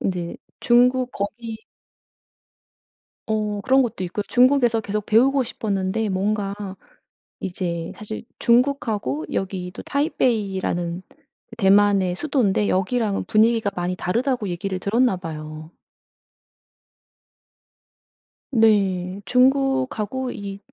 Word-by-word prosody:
인제 175 -3 -3 0.2
중국 250 +1 +3
거기 220 +2 -5 1.6
어 210 -2 -1
그런 265 +5 +4
것도 230 -7 -2
있고요. 195 +4 -3
중국에서 245 -3 +4
계속 210 0 -3
배우고 265 +5 +4
싶었는데 210 -1 -2
뭔가 200 +1 -1 0.8
이제 175 -3 -3
사실 215 0 -7 0.2
중국하고 235 - +1
여기도 185 -1 -4
타이베이라는 195 - -1 0.6
대만의 200 -3 +4
수도인데 215 -6 +1
여기랑은 200 +2 0
분위기가 220 0 +3
많이 180 +1 -2
다르다고 235 +5 -1
얘기를 185 +2 -3
들었나 220 +2 +2
봐요. 155 -2 -8 2.8
네. 195 -5 +2
중국하고 260 -1 +1
이 200 -1 -7
210 Hz, 235 characters per minute, -22 LUFS, 185-240 Hz, 2.8 s, 그런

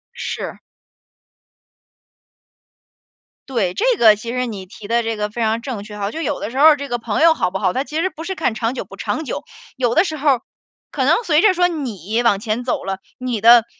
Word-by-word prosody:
是。 - - -5 2.9
对， 210 -9 0
这 445 - -1
个 220 -7 +7
其 215 +3 -8
实 250 0 -1
你 205 -5 -6
提 205 +2 -12
的 235 +2 +2
这 225 0 -2
个 210 0 -2
非 235 +3 -5
常 225 +1 +1
正 235 -5 -5
确 210 0 -10
哈。 200 0 -2
就 320 - -5
有 295 -3 -2
的 215 - -4
时 260 - -6
候 300 - +6
儿， 300 - +7
这 280 0 -5
个 245 - -1
朋 225 0 -2
友 330 0 +7
好 180 - -1
不 190 - -2
好， 185 -2 0
他 260 - 0
其 300 +2 -4
实 375 - +1
不 320 - -9
是 380 +2 -4
看 285 -10 0
长 225 +3 -1
久 - - -5
不 - - -12
长 315 - -3
久。 - - -4 0.3
有 240 -2 0
的 335 - +6
时 315 -5 -3
候 290 +1 +2
儿， 255 -3 +3 0.5
可 - - -1
能 - - +5
随 315 -4 +3
着 405 -2 +5
说 355 0 +3
你 230 - -3
往 205 -4 +3
前 220 +3 -2
走 250 - -2
了， 195 0 -3 0.2
你 250 -4 -3
的 235 0 +7
240 Hz, 250 characters per minute, -20 LUFS, 215-295 Hz, 2.9 s, 个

